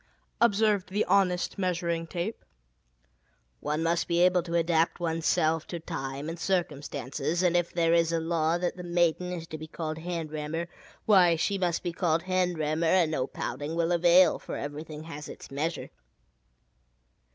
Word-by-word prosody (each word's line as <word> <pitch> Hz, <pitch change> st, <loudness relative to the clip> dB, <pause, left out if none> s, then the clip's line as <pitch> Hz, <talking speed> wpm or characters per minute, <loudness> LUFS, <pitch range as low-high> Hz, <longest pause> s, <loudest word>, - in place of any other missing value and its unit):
'" -, -, -42 dB
observed 210 Hz, -4 st, +3 dB
the 205 Hz, +3 st, 0 dB
honest 180 Hz, -1 st, +1 dB
Measuring 170 Hz, -2 st, -1 dB
Tape. 180 Hz, +6 st, -4 dB, 1.2 s
"One 150 Hz, +2 st, -2 dB
must 170 Hz, +1 st, +1 dB
be 170 Hz, 0 st, +1 dB
able 180 Hz, 0 st, +4 dB
to 170 Hz, 0 st, -4 dB
adapt 165 Hz, 0 st, +2 dB
one's 165 Hz, -1 st, -1 dB
self 160 Hz, 0 st, +2 dB
to 170 Hz, -, -5 dB
time 135 Hz, -2 st, -5 dB
and 165 Hz, +1 st, -5 dB
circumstances, 155 Hz, -2 st, -2 dB
and 175 Hz, -1 st, +3 dB
if 175 Hz, -1 st, +1 dB
there 165 Hz, -1 st, +2 dB
is 170 Hz, -1 st, +3 dB
a 165 Hz, -, +1 dB
law 165 Hz, 0 st, +1 dB
that 175 Hz, +1 st, -2 dB
the -, -, -6 dB
'maiden' 175 Hz, 0 st, +1 dB
is 170 Hz, -2 st, -5 dB
to 155 Hz, -1 st, -8 dB
be 155 Hz, -, -7 dB
called 155 Hz, 0 st, -5 dB
'hand 165 Hz, -2 st, -4 dB
rammer,' 155 Hz, +3 st, -4 dB, 0.4 s
why, 180 Hz, -5 st, +6 dB
she 195 Hz, +4 st, 0 dB
must 175 Hz, -2 st, 0 dB
be 175 Hz, -2 st, -2 dB
called 170 Hz, -2 st, +1 dB
'hand 185 Hz, -2 st, 0 dB
rammer,' 155 Hz, +2 st, 0 dB
and 170 Hz, -2 st, +3 dB
no 130 Hz, -4 st, -1 dB
pouting 150 Hz, +3 st, -4 dB
will 170 Hz, 0 st, +1 dB
avail, 175 Hz, 0 st, +5 dB
for -, -, -6 dB
everything 150 Hz, +1 st, -6 dB
has 150 Hz, -2 st, -8 dB
its -, -, -11 dB
measure." 155 Hz, +5 st, -3 dB
170 Hz, 175 wpm, -28 LUFS, 160-180 Hz, 1.2 s, why